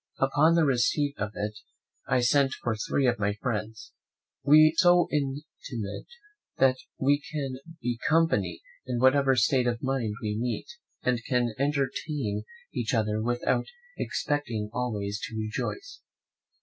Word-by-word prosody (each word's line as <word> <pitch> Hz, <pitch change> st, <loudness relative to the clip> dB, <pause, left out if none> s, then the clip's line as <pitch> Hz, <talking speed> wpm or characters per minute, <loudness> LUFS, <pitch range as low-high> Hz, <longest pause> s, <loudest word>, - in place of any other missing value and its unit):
Upon 145 Hz, +5 st, +3 dB
the 165 Hz, -2 st, +4 dB
receipt 140 Hz, +2 st, +2 dB
of 105 Hz, +1 st, -3 dB
it 105 Hz, 0 st, -4 dB, 0.5 s
I 125 Hz, -, +2 dB
sent 135 Hz, +2 st, +3 dB
for 120 Hz, -2 st, 0 dB
three 130 Hz, +5 st, 0 dB
of 120 Hz, -4 st, +2 dB
my 100 Hz, 0 st, +1 dB
friends. 110 Hz, -1 st, -4 dB, 0.5 s
We 155 Hz, +3 st, +7 dB
are -, -, -5 dB
so 175 Hz, 0 st, +5 dB
intimate 135 Hz, -7 st, -4 dB, 0.5 s
that 130 Hz, -1 st, +4 dB, 0.2 s
we 145 Hz, +2 st, +2 dB
can 135 Hz, -4 st, -3 dB, 0.2 s
be 120 Hz, -1 st, -1 dB
company 150 Hz, -, +2 dB, 0.3 s
in 125 Hz, -1 st, -1 dB
whatever 135 Hz, +2 st, +4 dB
state 125 Hz, +1 st, +3 dB
of 120 Hz, -1 st, -2 dB
mind 130 Hz, -6 st, -1 dB
we 105 Hz, -1 st, -1 dB
meet, 120 Hz, -2 st, -2 dB, 0.4 s
and 125 Hz, -2 st, 0 dB
can 120 Hz, -3 st, +1 dB
entertain 140 Hz, -4 st, -1 dB, 0.3 s
each 120 Hz, +1 st, -1 dB
other 105 Hz, -1 st, 0 dB
without 120 Hz, +2 st, 0 dB, 0.3 s
expecting 120 Hz, -8 st, -2 dB
always 105 Hz, -4 st, -2 dB
to 110 Hz, -, -7 dB
rejoice. 385 Hz, -, -4 dB
125 Hz, 135 wpm, -28 LUFS, 110-140 Hz, 0.5 s, We